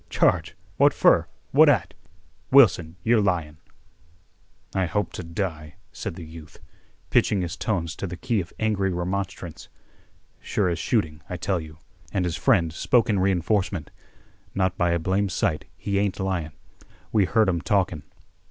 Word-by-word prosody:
Charge? -, -, +1 dB, 0.2 s
What -, -, +5 dB
fer? -, -, +4 dB, 0.2 s
What -, -, +7 dB
at? -, -, +2 dB, 0.6 s
Wilson, 95 Hz, -, +5 dB
you're 115 Hz, -1 st, +4 dB
lyin'." 85 Hz, -6 st, -1 dB, 1.2 s
"I 95 Hz, -2 st, +1 dB
hope 105 Hz, +1 st, -2 dB
to -, -, -5 dB
die," 80 Hz, -2 st, -4 dB, 0.2 s
said -, -, -6 dB
the 85 Hz, -, -8 dB
youth, 80 Hz, -1 st, -12 dB, 0.5 s
pitching 100 Hz, -, +3 dB
his 85 Hz, -1 st, -4 dB
tones 85 Hz, -6 st, -2 dB
to 100 Hz, -, -4 dB
the 90 Hz, 0 st, -7 dB
key 115 Hz, -3 st, 0 dB
of 85 Hz, -, -10 dB
angry 100 Hz, -3 st, 0 dB
remonstrance. 90 Hz, -1 st, -4 dB, 0.7 s
"Sure 100 Hz, -3 st, 0 dB
as 85 Hz, -1 st, -2 dB
shooting, 80 Hz, -10 st, -1 dB
I 90 Hz, -, -4 dB
tell 90 Hz, +1 st, -1 dB
you." 80 Hz, -1 st, -10 dB, 0.3 s
And 95 Hz, -3 st, 0 dB
his 85 Hz, -2 st, -1 dB
friend 90 Hz, -11 st, +2 dB
spoke 115 Hz, +6 st, +2 dB
in 100 Hz, -, +1 dB
re 95 Hz, +1 st, +3 dB
enforcement. 90 Hz, -2 st, -1 dB, 0.6 s
"Not 95 Hz, -2 st, +1 dB
by 90 Hz, -1 st, +1 dB
a 85 Hz, -, +2 dB
blame 95 Hz, +4 st, 0 dB
sight, 80 Hz, -3 st, -1 dB
he 100 Hz, -1 st, -1 dB
ain't 100 Hz, -1 st, -1 dB
lyin'. 90 Hz, -6 st, -2 dB, 0.6 s
We 105 Hz, -3 st, +3 dB
heard 110 Hz, +2 st, +3 dB
'em 85 Hz, -3 st, 0 dB
talkin'." 90 Hz, -6 st, 0 dB
90 Hz, 160 wpm, -25 LUFS, 85-100 Hz, 1.2 s, What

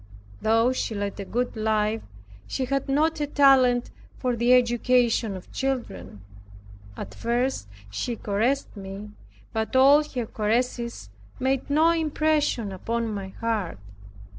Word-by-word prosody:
Though 225 Hz, +3 st, +3 dB
she 230 Hz, -3 st, -2 dB
led 200 Hz, 0 st, -3 dB
a 200 Hz, -, -4 dB
good 245 Hz, +5 st, -2 dB
life, 215 Hz, 0 st, 0 dB
yet 100 Hz, 0 st, -20 dB
she 260 Hz, -, -2 dB
had 275 Hz, +1 st, -2 dB
not 310 Hz, +3 st, +1 dB
a 295 Hz, -, 0 dB
talent 260 Hz, -4 st, +4 dB, 0.3 s
for 250 Hz, -2 st, -1 dB
the 235 Hz, +1 st, +2 dB
education 240 Hz, -3 st, +3 dB
of 180 Hz, -, -13 dB
children. 105 Hz, -, -4 dB, 0.8 s
At 100 Hz, -, -7 dB
first 240 Hz, -, -1 dB, 0.2 s
she 235 Hz, -, -3 dB
caressed 225 Hz, +7 st, -1 dB
me, 200 Hz, +1 st, -8 dB, 0.4 s
but 220 Hz, +2 st, -2 dB
all 280 Hz, +3 st, +7 dB
her 255 Hz, -5 st, -4 dB
caresses 235 Hz, -, -2 dB, 0.3 s
made 265 Hz, +1 st, 0 dB
no 315 Hz, +3 st, +4 dB
impression 305 Hz, -8 st, 0 dB
upon 225 Hz, +4 st, -2 dB
my 200 Hz, -2 st, -4 dB
heart. 210 Hz, -, -3 dB
235 Hz, 135 wpm, -25 LUFS, 210-265 Hz, 0.8 s, all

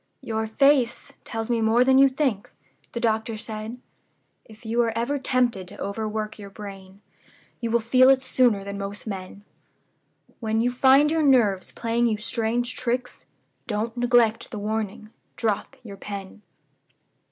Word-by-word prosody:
'Your 220 Hz, -1 st, -2 dB
face 260 Hz, +1 st, +2 dB
tells 225 Hz, -1 st, -4 dB
me 230 Hz, -1 st, +1 dB
more 225 Hz, +2 st, +4 dB
than 265 Hz, +1 st, +5 dB
you 275 Hz, 0 st, +7 dB
think,' 260 Hz, -7 st, -1 dB, 0.4 s
the 235 Hz, -, -3 dB
doctor 220 Hz, -1 st, 0 dB
said: 215 Hz, +2 st, -6 dB, 0.7 s
'If 220 Hz, +1 st, -17 dB
you 230 Hz, +2 st, +1 dB
are 230 Hz, -1 st, +1 dB
ever 255 Hz, +5 st, -1 dB
tempted 245 Hz, -8 st, 0 dB
to -, -, -12 dB
overwork 215 Hz, +1 st, -4 dB
your 200 Hz, -1 st, -9 dB
brain, 195 Hz, -1 st, -11 dB, 0.6 s
you 235 Hz, -, -3 dB
will 235 Hz, +1 st, +3 dB
feel 255 Hz, +3 st, +5 dB
it 265 Hz, -1 st, +4 dB
sooner 245 Hz, -6 st, +2 dB
than 200 Hz, 0 st, -6 dB
most 200 Hz, +1 st, -5 dB
men. 195 Hz, -1 st, -7 dB, 1.0 s
When 220 Hz, -1 st, -1 dB
you 245 Hz, +2 st, +2 dB
find 270 Hz, +4 st, +5 dB
your 320 Hz, 0 st, +1 dB
nerves 235 Hz, -10 st, +3 dB
playing 235 Hz, +1 st, 0 dB
you 220 Hz, -2 st, 0 dB
strange 230 Hz, +2 st, -1 dB
tricks, 250 Hz, 0 st, -3 dB, 0.4 s
don't 225 Hz, +1 st, -2 dB
neglect 240 Hz, -2 st, +2 dB
the 215 Hz, -, -6 dB
warning 215 Hz, 0 st, -4 dB, 0.2 s
drop 220 Hz, +3 st, -2 dB
your 200 Hz, -4 st, -9 dB
pen. 200 Hz, 0 st, -8 dB
225 Hz, 150 wpm, -24 LUFS, 210-245 Hz, 1.0 s, you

